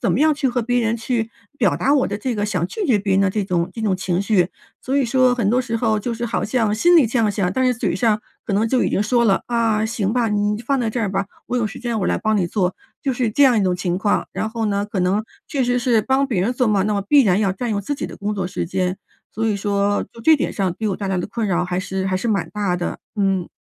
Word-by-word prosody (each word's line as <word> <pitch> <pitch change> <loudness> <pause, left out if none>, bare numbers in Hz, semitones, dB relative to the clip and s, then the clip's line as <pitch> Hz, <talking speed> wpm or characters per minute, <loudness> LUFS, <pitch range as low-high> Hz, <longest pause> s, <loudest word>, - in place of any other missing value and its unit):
怎 - - +1
么 - - +1
样 310 0 +4
去 280 - -1
和 245 0 0
别 245 +1 +1
人 225 0 +1
去 230 -1 -2 0.3
表 205 -9 +2
达 280 - +2
我 275 - +3
的 205 - -4
这 245 +2 -2
个 205 - -1
想 175 -5 -1
拒 410 - -4
绝 230 -6 +3
别 195 -1 0
人 195 - +3
的 190 - +2
这 210 +1 -1
种 180 -2 -1
这 225 - -7
种 205 -4 +1
情 180 -1 -1
绪， 195 -3 +2 0.3
所 265 - -2
以 280 - +3
说 255 +1 +3
很 225 -5 0
多 250 +3 +3
时 230 -1 -2
候 220 -2 +1
就 235 +3 -3
是 235 +1 -3
好 230 - -1
像 220 -2 +1
心 345 +11 +4
里 295 -8 +6
这 240 +2 -1
样 215 -2 +3
想， 190 -3 -1
但 260 +5 +1
是 255 - +3
嘴 240 - -1
上 220 -3 +2 0.2
可 - - -3
能 215 +3 +2
就 255 0 +2
已 - - 0
经 200 - +1
说 235 +2 +2
了：” 195 -3 +2
啊， 225 -2 +1
行 220 -3 -1
吧， 240 -2 +1
你 210 0 0
就 235 - -10
放 275 -1 +1
在 230 -3 0
这 240 - -2
儿 205 -4 -1
吧， 195 +1 -1 0.2
我 250 - -2
有 230 -3 +1
时 - - -8
间 235 -2 -2
我 190 - -1
来 - - +1
帮 215 -1 +1
你 180 - +1
做， 180 0 -1 0.3
“就 270 -2 0
是 240 -3 0
这 285 +6 +4
样 250 -4 +5
一 205 - +2
种 180 -1 +1
情 180 -1 -2
况。 205 +2 0
然 220 - -3
后 225 -1 -2
呢， 200 0 0
可 205 -2 -3
能 195 +4 +1 0.2
确 270 -3 0
实 245 0 +1
是 235 -3 +2
帮 265 +4 +1
别 235 -8 -1
人 235 - 0
做 250 -1 +1
嘛， 200 -2 +2
那 210 +2 0
么 200 - 0
必 275 +8 +4
然 195 -2 +2
要 195 - +2
占 230 +6 -3
用 205 -2 0
自 250 +9 -3
己 - - -4
的 - - -9
工 210 +1 -3
作 190 -2 -2
时 180 - -3
间， 185 +1 -1 0.3
所 225 +2 -1
以 210 -2 +1
说 200 0 0
就 230 - -12
这 315 +6 +5
点 - - -2
上 190 -4 -1
给 220 - -2
我 195 - -1
带 200 - -4
来 190 - 0
的 180 - -2
困 215 +2 -3
扰 180 -1 +1
还 180 0 -2
是 190 0 -3
还 190 - -1
是 185 +5 -1
蛮 205 -2 0
大 200 -4 -1
的， 175 - -3 0.2
嗯。 195 -3 +1
215 Hz, 330 characters per minute, -21 LUFS, 195-240 Hz, 0.3 s, 里